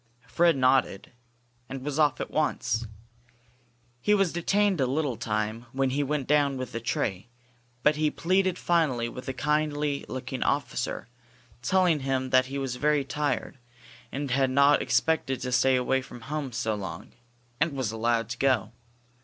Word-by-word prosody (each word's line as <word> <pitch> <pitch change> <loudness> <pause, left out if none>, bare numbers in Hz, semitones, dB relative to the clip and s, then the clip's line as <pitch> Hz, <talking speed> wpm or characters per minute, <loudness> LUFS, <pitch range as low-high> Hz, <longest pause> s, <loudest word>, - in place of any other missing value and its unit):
Fred 170 0 +3
nodded, 130 -6 +2 0.6
and 135 0 -6
was 150 +1 -2
off 150 -1 +3
at - - -4
once. 115 +2 0 1.1
He 210 +10 +3
was 195 -4 +1
detained 195 0 +1
a 130 - +2
little 140 -1 -1
time 110 +2 -3
when 135 0 +1
he 140 +2 0
went 145 -1 -1
down 145 -1 +2
with 130 -1 -5
the 115 - -3
tray, 105 -3 -2 0.6
but 150 0 +4
he 155 0 +2
pleaded 185 +3 +1
finally 150 -9 +1
with 125 +2 -8
a - - -2
kindly 150 +1 0
looking 130 0 -5
officer, 135 -5 -1 0.5
telling 175 +3 +3
him 130 -1 -1
that 130 0 +4
he 135 +1 -5
was 135 -2 -3
very 150 +1 +2
tired, 145 -2 -2 0.5
and 140 -1 -3
had 135 +1 +2
not 140 +2 +4
expected 155 -5 +1
to 125 0 -3
stay 130 +1 +4
away 130 +1 +1
from 120 -2 -11
home 140 +1 -4
so 115 -2 -1
long, 100 -2 -6 0.5
and 160 0 +1
was 130 -6 -2
allowed 115 0 0
to 115 - -5
go. 130 -6 +2
135 Hz, 160 wpm, -27 LUFS, 125-150 Hz, 1.1 s, but